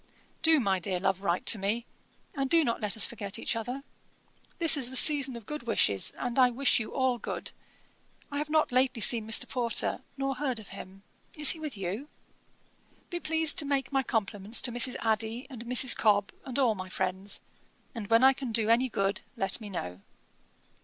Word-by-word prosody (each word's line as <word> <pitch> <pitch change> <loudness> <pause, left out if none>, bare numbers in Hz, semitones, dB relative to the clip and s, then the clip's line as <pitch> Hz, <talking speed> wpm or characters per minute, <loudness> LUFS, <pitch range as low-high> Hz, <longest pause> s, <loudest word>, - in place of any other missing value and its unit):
'Do, 320 -1 +4
my 195 -6 0
dear 180 0 -3
love, 190 0 -1
write 175 -2 -2
to 220 - +2
me; 215 +5 -2 0.5
and 275 -4 -3
do 330 +2 +4
not 235 -5 -2
let 210 +1 -2
us 215 - +5
forget 200 -3 -5
each 230 - -3
other. 245 +4 -5 0.7
This 330 -2 +3
is 260 -4 -1
the 260 - -9
season 275 -2 +5
of 230 -3 -10
good 300 -2 -8
wishes, 100 - +1
and 245 +1 -3
I 250 -1 +5
wish 250 +2 +1
you 220 - -6
all 260 -2 -1
good. - - -5 0.8
I 285 - -3
have 300 0 -4
not 310 -2 +1
lately 255 0 +2
seen 220 +1 +4
Mr. 220 - +5
Porter, 240 -3 0 0.2
nor 270 0 -2
heard 260 -3 -2
of 220 - -10
him. 195 0 -12 0.3
Is 300 -2 +9
he 325 - -8
with 300 -7 -7
you? 195 +9 -5 1.0
'Be 350 - -3
pleased 320 -1 +2
to 300 - 0
make 275 -2 -2
my 270 -1 +1
compliments 215 -2 0
to 245 - +2
Mrs. 245 +1 +1
Adey, 225 +3 -2
and 240 -2 -9
Mrs. 250 +1 +6
Cobb, 205 -2 +1
and 260 -1 -5
all 255 -5 +2
my 185 -2 -8
friends; 190 +2 -4 0.5
and 225 -5 -7
when 230 +2 +4
I 265 0 +7
can 260 -3 -6
do 220 -1 0
any 245 +3 +2
good, 195 -3 -2 0.2
let 195 +4 -2
me 210 - -8
know. 90 - -7
235 Hz, 200 wpm, -28 LUFS, 205-270 Hz, 1.0 s, Is